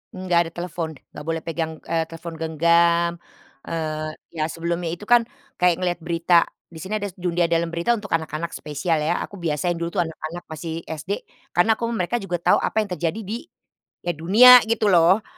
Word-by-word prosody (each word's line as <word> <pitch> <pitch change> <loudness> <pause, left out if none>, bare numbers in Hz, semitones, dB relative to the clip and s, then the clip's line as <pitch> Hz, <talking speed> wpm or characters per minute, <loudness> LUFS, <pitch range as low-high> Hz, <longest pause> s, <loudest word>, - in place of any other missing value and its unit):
Enggak 185 -2 +1
ada - - -10
telepon, 165 -3 -4 0.2
nggak 150 - -9
boleh 165 0 -1
pegang, 165 -1 -3
eee, 165 -1 -1
telepon 165 0 -8
genggam, 170 +1 +3 0.6
eee, 155 -1 -3 0.2
iya, 155 -1 -1
sebelumnya 170 +1 -3
itu 195 - -13
kan 235 +1 +4 0.3
kayak 180 -1 +4
ngelihat 175 -1 0
berita, 170 +1 +1 0.3
di 165 - -12
sini 190 +6 -4
ada 205 -1 -2
s - - -34
Dunia 175 -1 0
Dalam 170 0 +2
Berita 170 +7 0
untuk 210 -3 -2
anak-anak 160 +1 -4
spesial 155 +2 -1
ya, 165 +3 0
aku 200 - -9
biasain 170 +1 -1
dulu 170 0 -3
tuh - - +5
anak-anak 160 +2 -7
masih 160 +1 -5
SD, 160 +6 -5 0.2
karena 220 +6 +3
aku 230 +1 -3
mereka 220 -1 -1
juga 175 -2 -2
tahu - - +4
apa 220 - 0
yang 200 - -9
terjadi 175 +6 -2
di, 215 +1 -5 0.7
ya 175 - 0
dunia 215 +11 +8
gitu 220 -2 +2
loh. 180 +4 +5
170 Hz, 185 wpm, -23 LUFS, 165-185 Hz, 0.7 s, dunia